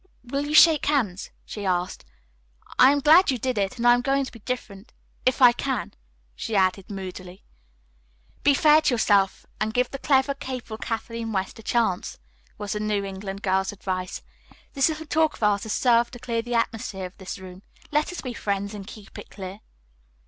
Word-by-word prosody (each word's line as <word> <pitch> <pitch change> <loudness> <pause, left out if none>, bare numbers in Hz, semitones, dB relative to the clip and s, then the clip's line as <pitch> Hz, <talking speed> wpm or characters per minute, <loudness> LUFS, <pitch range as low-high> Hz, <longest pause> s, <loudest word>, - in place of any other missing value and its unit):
"Will 275 +4 -3
you 300 - -1
shake 310 -2 +7
hands?" 230 -11 0 0.2
she 205 - -7
asked. 180 - -1 0.7
"I 260 - +8
am 285 0 +1
glad 320 +6 +6
you 260 - +1
did 250 -1 -1
it, 200 +5 -1
and 235 - -2
I 240 - +8
am 245 - +2
going 275 +1 +1
to - - -9
be 230 - -13
different 215 -3 -6 0.3
if 260 +1 +2
I 245 - +10
can," 250 -1 -3 0.4
she 225 - -4
added 190 0 +1
moodily. 185 -2 -8 1.0
"Be 285 -1 +4
fair 305 +1 +6
to 270 - +2
yourself 200 -4 +2
and 215 +1 -2
give 250 0 +1
the 275 - -6
clever, 270 0 +2
capable 255 -5 -6
Kathleen 230 0 -4
West 190 +3 -3
a - - -9
chance," 220 -5 0 0.4
was 205 -1 -5
the 210 - -3
New 210 -1 -1
England 195 +1 -6
girl's 190 0 +1
advice. 185 -2 -4 0.5
"This 275 +3 +3
little 315 0 -5
talk 315 0 +1
of - - -8
ours 205 -1 +3
has - - 0
served 235 -1 +3
to 245 - -9
clear 230 -1 -2
the 240 +1 -4
atmosphere 220 -4 -2
of 180 - -10
this 190 - -6
room. 185 -1 -11 0.3
Let 300 +3 +1
us 360 - -6
be 255 -2 -5
friends 200 -2 -2
and 200 -2 -8
keep 215 -3 -11
it - - -11
clear." 190 0 -8
225 Hz, 195 wpm, -25 LUFS, 195-260 Hz, 1.0 s, I